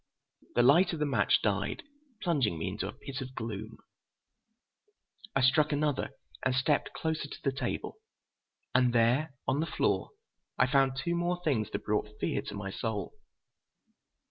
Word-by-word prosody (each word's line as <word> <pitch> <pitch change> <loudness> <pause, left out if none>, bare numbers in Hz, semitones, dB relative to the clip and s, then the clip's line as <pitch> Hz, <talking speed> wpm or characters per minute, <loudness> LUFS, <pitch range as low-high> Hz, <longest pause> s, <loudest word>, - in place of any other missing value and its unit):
The 120 - +5
light 170 +9 +6
of 165 - -3
the 150 - +2
match 140 - +3
died, 340 - 0 0.4
plunging 140 - +1
me 80 - -2
into 95 0 -3
a - - -4
pit 135 +5 -7
of 130 0 -7
gloom. 110 -1 -5 1.6
I 135 - +3
struck 145 +4 +4
another 145 -1 0 0.3
and 130 0 +2
stepped 140 +3 +1
closer 160 -2 -2
to - - -8
the 135 - +2
table. 130 -2 -3 0.8
And 125 -1 +4
there, 125 +6 +3
on 135 +2 +2
the 160 - 0
floor, - - 0 0.5
I 125 - +5
found 135 0 +3
two 170 +5 -1
more 175 +1 0
things 125 -10 +1
that - - -4
brought 105 0 -1
fear - - 0
to - - -7
my 100 -1 -4
soul. 105 -3 -3
130 Hz, 160 wpm, -31 LUFS, 115-150 Hz, 1.6 s, light